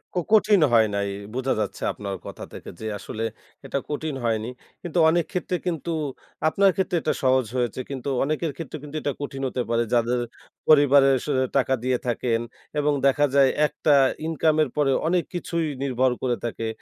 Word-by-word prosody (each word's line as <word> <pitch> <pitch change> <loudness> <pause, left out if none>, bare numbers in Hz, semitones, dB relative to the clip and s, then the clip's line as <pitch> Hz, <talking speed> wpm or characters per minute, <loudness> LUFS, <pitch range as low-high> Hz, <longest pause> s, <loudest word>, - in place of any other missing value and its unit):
কো - - +2
কঠিন 210 -3 +5
হয় 110 -1 +6
নাই। 100 0 -1 0.2
বোঝা 130 +1 0
যাচ্ছে 105 - -3
আপনার 100 -2 -5
কথা - - -8
থেকে - - -9
যে 110 - -7
আসলে 110 +3 -5 0.4
এটা 140 +1 -2
কঠিন 150 -1 -3
হয়নি। 110 0 0 0.3
কিন্তু 175 -1 -2
অনেক 170 0 +2
ক্ষেত্রে 180 0 -2
কিন্তু 170 0 -2 0.6
আপনার 195 +2 +4
ক্ষেত্রে 185 -2 0
এটা 155 - 0
সহজ 130 -1 +3
হয়েছে। 120 0 -1
কিন্তু 135 0 -4
অনেকের 155 +2 -1
ক্ষেত্রে 160 -2 -6
কিন্তু 150 +1 -9
এটা 145 - -1
কঠিন 135 -1 -5
হতে 125 0 -2
পারে 115 0 +2
যাদের 120 +1 +2 0.5
পরিবারে 140 -2 +6 0.2
স - - -10 0.3
টাকা 135 0 +2
দিয়ে 130 -1 +1
থাকেন 115 -1 0 0.4
এবং 145 0 +2
দেখা 145 +2 +3
যায় 135 -1 +6 0.2
একটা 150 0 +1 0.3
ইনকাম 160 -1 +2
এর 140 - -3
পরে 140 -2 +3 0.2
অনেক 175 0 +2
কিছুই 170 -2 -2 0.2
নির্ভর 130 -1 +2
করে 125 -2 +1
থাকে। 115 -1 -3
140 Hz, 175 wpm, -24 LUFS, 125-160 Hz, 0.6 s, হয়